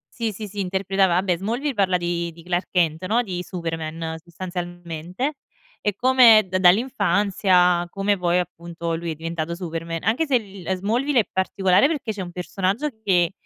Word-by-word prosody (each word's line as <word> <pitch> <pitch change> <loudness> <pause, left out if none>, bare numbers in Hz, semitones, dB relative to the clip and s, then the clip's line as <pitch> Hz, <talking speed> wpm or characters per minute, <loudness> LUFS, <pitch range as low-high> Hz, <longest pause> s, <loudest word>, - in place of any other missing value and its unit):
Sì, 230 -2 -1
sì, 210 +1 -7
sì, 205 +1 -8
interpretava 190 -1 +1
a 185 - +1
beh, 180 -3 +1
"Smallville" 240 - -2
parla 190 -5 +2
di 170 -1 -2
di 165 0 -15
Clark 175 +1 -1
Kent, 165 -2 +1
no, 235 +4 +2
di 180 -5 -4
Superman, 165 -2 -4
sostanzialmente, 175 - -5 0.4
e 205 -2 -1
come 245 -3 +6
d 185 0 -1
dall'infanzia 185 -3 +3
come 195 +2 0
poi 175 0 +2
appunto 170 -1 -4
lui 165 +1 -3
è 160 - -3
diventato 165 +1 -4
Superman. 165 -2 -5
Anche 235 - +1
se 270 -3 +4
l - - -4
li 195 -2 -12
ehm, 190 - 0
Smallville 240 +8 +1
è - - -9
particolare 190 +4 +3
perché 290 -8 -2
c'è 205 -2 -5
un 175 -1 -6
personaggio 195 +9 -2
che 180 -4 +3
185 Hz, 180 wpm, -23 LUFS, 170-205 Hz, 0.4 s, come